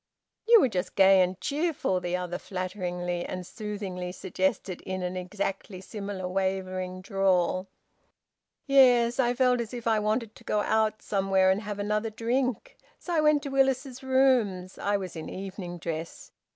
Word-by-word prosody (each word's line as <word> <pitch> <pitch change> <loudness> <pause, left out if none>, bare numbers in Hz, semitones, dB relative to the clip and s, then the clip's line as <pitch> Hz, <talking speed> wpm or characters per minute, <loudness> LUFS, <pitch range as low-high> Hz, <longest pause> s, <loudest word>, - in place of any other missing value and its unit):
"You 465 0 +8
were 270 - +4
just 185 -6 -3
gay 190 -1 +6
and 185 0 0
cheerful," 295 - 0
the 180 0 -2
other 180 -1 -4
flatteringly 180 -2 -3
and 185 -1 -5
soothingly 195 -3 -5
suggested, 190 -1 -2
in 185 -1 -4
an 180 0 -3
exactly 190 +1 -4
similar 195 -1 -5
wavering 185 -1 -2
drawl. 185 -2 +1 1.0
"Yes. 250 -3 +5
I 245 -1 +2
felt 250 -1 +3
as 235 +1 -6
if 240 - -7
I 225 -2 +3
wanted 215 +1 -1
to - - -17
go 210 - 0
out 220 0 +1
somewhere 195 -1 +2
and 195 +2 0
have 210 -2 -5
another 210 +2 -1
drink. 240 +2 -2 0.2
So 355 - -5
I 320 - +3
went 300 -1 +3
to 280 - -4
Willis's 270 -1 +1
Rooms. 255 -9 +2
I 205 0 +1
was 185 -3 -6
in 160 - -6
evening 185 -2 -6
dress. 165 0 -6
200 Hz, 160 wpm, -28 LUFS, 185-240 Hz, 1.0 s, You